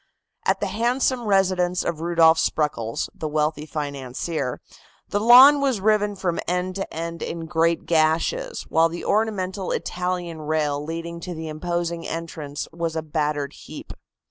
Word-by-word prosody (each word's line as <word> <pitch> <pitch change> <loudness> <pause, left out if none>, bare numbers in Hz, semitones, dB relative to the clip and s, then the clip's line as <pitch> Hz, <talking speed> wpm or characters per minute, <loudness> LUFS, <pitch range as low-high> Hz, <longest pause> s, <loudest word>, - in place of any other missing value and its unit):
At - - +2
the - - +1
handsome 245 +1 0
residence 185 -2 +2
of 160 -2 -3
Rudolph 165 -1 +4
Spreckels, 115 -7 -1
the 155 - -5
wealthy 150 0 -1
financier, 140 -1 -4 0.5
the 205 - -1
lawn 255 +6 +8
was 265 -6 +1
riven 210 0 +2
from 180 -3 -2
end 180 +1 -1
to 195 - -4
end 165 +1 -5
in 165 -1 -4
great 165 +1 +1
gashes, 170 - +1
while 165 +1 +3
the 170 +1 -6
ornamental 200 -3 0
Italian 180 -2 -3
rail 150 -2 -1
leading 165 +2 -5
to 175 +1 -6
the 160 0 -6
imposing 170 +1 -3
entrance 160 -3 -5
was 165 -1 -3
a 160 - -2
battered 150 -2 -2
heap. - - -10
170 Hz, 145 wpm, -23 LUFS, 155-190 Hz, 0.5 s, lawn